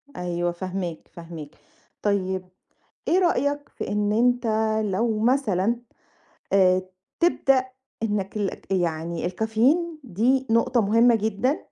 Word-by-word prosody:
أيوه، 175 -1 -2
فاهماك، 180 -2 -5
فاهماك 165 -3 -9 0.5
طيب 190 -2 0 0.6
إيه 360 - +4
رأيك 290 -5 +1
في - - -6
إن 210 0 0
أنت 245 +2 +2 0.4
لو 215 +3 0
مثلًا 230 -3 +2 0.8
آآ 185 -1 +4 0.4
تبدأ 270 -6 +3 0.4
إنك 205 -2 -2
لك 200 -1 -3
يعني 170 -1 -1
الcaffeine 245 - +1
دي 255 +5 +1
نقطة 235 +2 +3
مهمة 230 +3 +4
جدًا 220 +6 0
210 Hz, 110 wpm, -24 LUFS, 185-245 Hz, 0.8 s, إيه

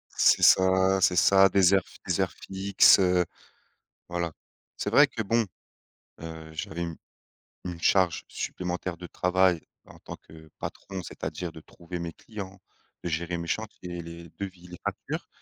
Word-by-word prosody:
C'est - - +4
ça 95 +1 +5
c'est 90 -1 +4
ça, 95 +2 +6
des 95 0 +4
heures 95 -2 +3
fi - - -16
des - - 0
heures - - 0
fixes, 95 +1 +4
heu, 90 -1 +3 0.8
voilà. 85 -2 -2 0.5
C'est - - -2
vrai 145 +6 +7
que, 125 -4 -5
bon, 115 +3 +2 0.8
heu, 80 -1 -8
j'avais 80 +2 -5
une 85 -2 -4 0.7
une 90 -2 -6
charge 85 -5 +2
supplémentaire 90 0 -4
de 90 +1 -9
travail 90 -1 +2 0.2
en - - -16
tant - - -8
que 80 0 -16
patron, 95 -1 -6
c'est-à-dire 80 +2 -5
de 80 - -11
trouver 85 +2 -8
mes 85 -1 -4
clients, 100 -2 -9 0.4
de - - -1
gérer 85 +2 -2
mes 85 - -5
chantiers, 90 -3 -4
les 85 0 -10
devis, 95 -3 -7
les 90 0 -11
factures, - - -4
90 Hz, 160 wpm, -27 LUFS, 85-95 Hz, 0.8 s, vrai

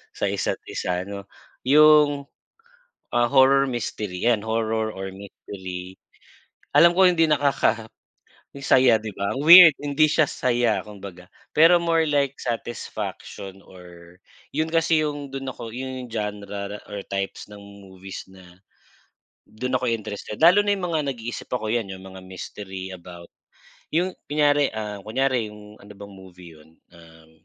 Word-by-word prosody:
sa - - -2
isa't - - -2
isa, 90 0 -3
'no, 100 0 -8 0.4
yung, 150 0 +5 0.9
ah, 120 0 +2
horror 135 +1 +4
mystery, 105 -6 -4
yan, 120 -3 +3
horror 110 0 -1
or 95 0 -6
mystery, 95 -1 -9 0.7
alam 170 +1 +6
ko 190 - +5
hindi 165 -2 +2
nakakasaya, 140 -7 0 0.9
'di 110 0 -7
ba, 100 +6 -3
weird, 165 +1 +9
hindi 145 +2 +2
siya 155 0 +3
saya 120 -4 0
kumbaga. 95 -3 -12 0.2
Pero 165 +3 +6
more 165 -2 +1
like 140 -2 +1
satisfaction 100 -4 -6
or 90 -2 -15 0.4
yun 160 +1 -1
kasi 165 -1 +2
yung 145 -1 -5
dun 135 0 -6
ako 115 - -8
yung 130 +1 -6
genre 105 -2 -5
or 100 -1 -6
types 100 0 -4
ng 105 -1 -13
movies 100 -1 -11
na 90 -2 -17 0.9
dun 125 +4 -2
ako'y 120 -2 0
interested 105 +3 -7
lalo 180 +5 +7
na 205 0 +2
yung 180 -3 -4
mga 155 -3 -1
nag-iisip 120 -1 -7
ako, 110 -4 -3
'yan, 115 -3 -1
yung 95 0 -11
mga 95 0 -11
mystery 95 0 -8
about 85 -1 -11 0.7
yung 180 +3 +1 0.2
kunyari, 145 -1 +2
ah, 105 -2 -5
kunyari 125 +1 0
yung 105 0 -13
ano 100 +1 -14
bang 100 0 -11
movie 95 -3 -14
yun, 80 +1 -21 0.2
um, 80 -1 -18
110 Hz, 140 wpm, -23 LUFS, 95-140 Hz, 0.9 s, weird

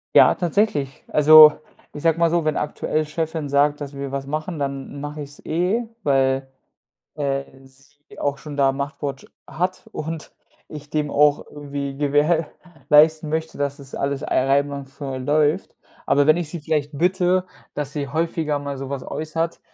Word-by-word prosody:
Ja, - - +7
tatsächlich. 170 -7 -1
Also, 150 0 +9 0.4
ich 145 - -9
sage 165 0 +2
mal 170 -1 +4
so, 170 -1 0
wenn 155 - +1
aktuell 150 +1 -1
Chefin 160 -1 -3
sagt, 145 +1 +2
dass 140 0 -6
wir 140 -1 -5
was 135 0 -4
machen, 155 +3 -4
dann 140 0 -4
mache 145 +1 -6
ich 140 - -11
es 145 - -17
eh, 185 +9 0 0.2
weil, 135 -1 +2 0.7
äh, 140 -2 -1 0.2
sie 140 +2 -18
auch 140 -1 -1
schon 150 -2 -8
da 140 -1 +4
'n 135 - -6
Machtwort 140 -1 -5 0.2
hat 185 +3 -3
und 160 0 -6 0.4
ich 150 -1 -10
dem 150 -1 -1
auch 145 0 +3
irgendwie 140 -1 -5
gewährleisten 155 +1 +2
möchte, 160 +1 -3
dass 140 0 -2
das 140 -1 -10
alles 140 0 -2
ei - - -5 0.2
einwandfrei 140 -1 -1
läuft. 150 +6 +1 0.3
Aber 145 +1 +3
wenn 155 - +6
ich 175 -3 -3
sie 170 - -6
vielleicht 150 -1 -2
bitte, 180 +2 +2 0.3
dass 145 -1 -4
sie 145 -1 -3
häufiger 155 0 -1
mal 140 -1 -5
sowas 135 0 -5
äußert, 165 +2 -3
145 Hz, 165 wpm, -22 LUFS, 140-160 Hz, 0.7 s, Also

